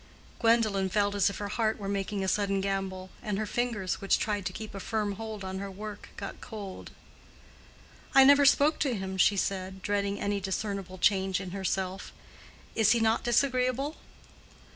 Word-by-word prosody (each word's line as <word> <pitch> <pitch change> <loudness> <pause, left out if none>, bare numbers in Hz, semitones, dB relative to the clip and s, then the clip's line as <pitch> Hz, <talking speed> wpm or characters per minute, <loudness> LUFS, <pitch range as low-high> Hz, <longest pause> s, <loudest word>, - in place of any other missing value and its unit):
Gwendolen 220 -5 +3
felt 205 +1 +1
as 200 0 +3
if 200 - -6
her 205 - -4
heart 220 0 0
were 200 - -6
making 200 0 -2
a - - -1
sudden 195 0 +1
gambol, 190 -1 -3
and 210 -2 -2
her 215 - -1
fingers, 220 -5 -2
which 195 - +3
tried 205 -4 -1
to - - -4
keep 215 +2 -7
a 195 - -6
firm 210 0 -1
hold 215 0 -6
on 190 0 -4
her 200 0 -5
work, 205 +2 -8
got - - -7
cold. 205 -4 -8 1.3
"I 270 - +9
never 285 +1 +7
spoke 290 +3 +4
to 270 -5 +1
him," 190 -1 -4
she 200 +2 +5
said, 190 0 -2
dreading 200 0 -1
any 205 0 -1
discernible 195 -1 -3
change 190 0 +2
in 190 -2 -6
herself. 190 0 -3 0.6
"Is 220 0 +4
he 235 - +2
not 225 0 +2
disagreeable?" 255 +3 +1
200 Hz, 175 wpm, -29 LUFS, 190-220 Hz, 1.3 s, I